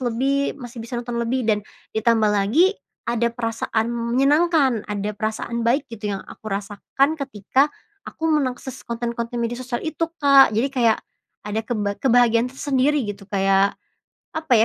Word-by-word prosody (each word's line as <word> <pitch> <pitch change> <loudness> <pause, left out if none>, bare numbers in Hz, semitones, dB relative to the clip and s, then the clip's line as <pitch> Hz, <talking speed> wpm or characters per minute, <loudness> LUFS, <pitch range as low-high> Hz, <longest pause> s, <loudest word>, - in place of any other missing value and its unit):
lebih, 270 +4 0
masih 245 -3 -9
bisa 235 +2 -6
nonton 240 0 -3
lebih, 245 +2 0
dan 215 -2 +2 0.3
ditambah 220 -1 +3
lagi 225 - +3 0.3
ada 235 0 +1
perasaan 230 -1 -1
menyenangkan, 270 +2 +2
ada 205 0 -2
perasaan 220 +2 -3
baik 265 +4 +1
gitu 210 -2 -3
yang 195 - -8
aku - - -13
rasakan 210 +9 -1
ketika 265 +2 +1 0.4
aku - - -11
mengakses 265 -3 -2
konten-konten 235 0 -3
media 240 +1 -2
sosial 250 -1 -4
itu, 325 +1 -1 0.2
Kak. 275 -5 +7
Jadi 245 +6 +2
kayak 240 -4 +2 0.4
ada 210 +1 -2
keba 205 -4 -2
kebahagiaan 240 -2 +4
tersendiri 275 +2 +1
gitu 200 -1 -7
kayak, 195 0 +2 0.6
apa 315 -4 0
235 Hz, 145 wpm, -22 LUFS, 220-270 Hz, 0.6 s, Kak